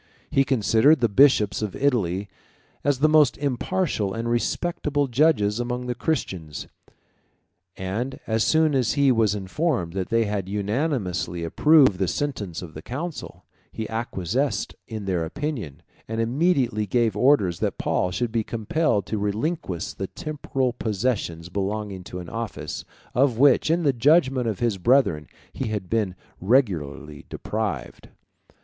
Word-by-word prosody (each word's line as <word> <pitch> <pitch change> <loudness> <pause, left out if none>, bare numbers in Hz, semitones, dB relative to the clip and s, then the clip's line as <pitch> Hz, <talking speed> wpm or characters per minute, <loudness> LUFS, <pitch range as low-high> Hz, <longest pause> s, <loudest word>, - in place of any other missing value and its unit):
He 135 - +4
considered 130 +3 +4
the 120 - +3
bishops 110 -3 +4
of 105 -3 -3
Italy 100 -9 0 0.6
as 140 -2 +1
the 155 - +6
most 155 -3 +4
impartial 140 - -1
and 115 +1 -3
respectable 145 +4 0
judges 120 -5 +2
among 125 +1 -3
the 125 - -1
Christians, 95 - -3 1.1
and 110 +8 -3
as 110 -1 +1
soon 155 -1 +3
as 125 -5 +2
he 140 -2 +4
was 110 -4 +2
informed 100 - -1
that 95 -1 -3
they 115 -1 +2
had 100 -3 -3
unanimously 100 - -1
approved 130 - +4
the 95 - +1
sentence 100 - -3
of 80 -3 -10
the 80 - -8
council, 150 - -6 0.3
he 110 - -5
acquiesced 115 - -2
in 110 -3 -6
their 90 -3 0
opinion, 110 - -5 0.2
and 115 0 -3
immediately 120 - +1
gave 115 -1 +1
orders 105 - +3
that - - -1
Paul 90 - 0
should 110 +6 -2
be 115 -1 0
compelled 110 - 0
to 110 - -3
relinquish 105 - -2
the 95 - -4
temporal 135 -3 -3
possessions 105 -7 -2
belonging 100 0 -3
to - - -7
an 90 -1 -7
office, 115 +4 -5 0.3
of 125 -2 +2
which, 140 +3 +5
in 170 +1 +2
the 140 -3 +3
judgment 130 -1 +3
of 110 -4 -1
his 115 -5 0
brethren, 105 - +3 0.3
he 130 - -3
had 105 -4 -4
been 105 -5 0 0.2
regularly 80 - 0
deprived. 105 - -4
115 Hz, 145 wpm, -24 LUFS, 95-135 Hz, 1.1 s, the